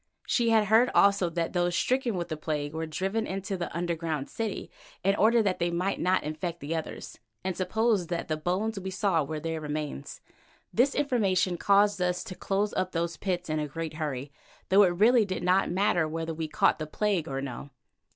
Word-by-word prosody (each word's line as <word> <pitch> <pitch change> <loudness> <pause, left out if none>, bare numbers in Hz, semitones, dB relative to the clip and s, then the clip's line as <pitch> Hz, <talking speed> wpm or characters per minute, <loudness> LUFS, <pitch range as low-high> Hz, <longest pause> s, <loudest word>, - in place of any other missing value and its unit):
She 235 -2 +2
had 220 -2 +4
heard, 225 +5 +5
also, 200 -3 +4
that 165 0 -2
those 175 -1 +1
stricken 255 -1 +1
with 175 -1 -3
the 155 - -2
plague 150 -1 -3
were 160 0 -3
driven 195 +8 -2
into 195 +1 -3
the 175 -2 -4
underground 165 -4 -3
city 225 -3 -4 0.3
in 195 +1 +3
order 225 +2 +4
that 190 -3 0
they 175 0 +1
might 180 +3 -1
not 185 +1 +2
infect 160 +3 -4
the 155 +3 -3
others, 160 - -6 0.2
and 190 -1 -2
supposed 200 -1 +1
that 170 -1 -2
the 155 - 0
bones 190 +7 -1
we 190 0 -5
saw 190 -4 +1
were 155 +2 -4
their 165 0 -3
remains. 150 - -5 0.5
This 260 +4 +3
information 195 -10 +1
caused 200 +2 +3
us 180 0 0
to - - -7
close 200 +3 -1
up 185 0 -1
those 170 0 -1
pits 180 -3 -2
again 155 -1 -1
in 150 - -1
a - - -9
great 160 +1 -5
hurry, 145 -3 -4 0.4
though 195 +1 +7
really 220 +7 +4
it 210 - 0
did 185 -2 -3
not 185 +2 +3
matter 175 -3 +2
whether 165 +1 -3
we 160 0 -3
caught 195 +4 +2
the 155 - -4
plague 195 0 0
or 135 -1 -3
no. 135 +1 -6
180 Hz, 205 wpm, -28 LUFS, 160-200 Hz, 0.5 s, though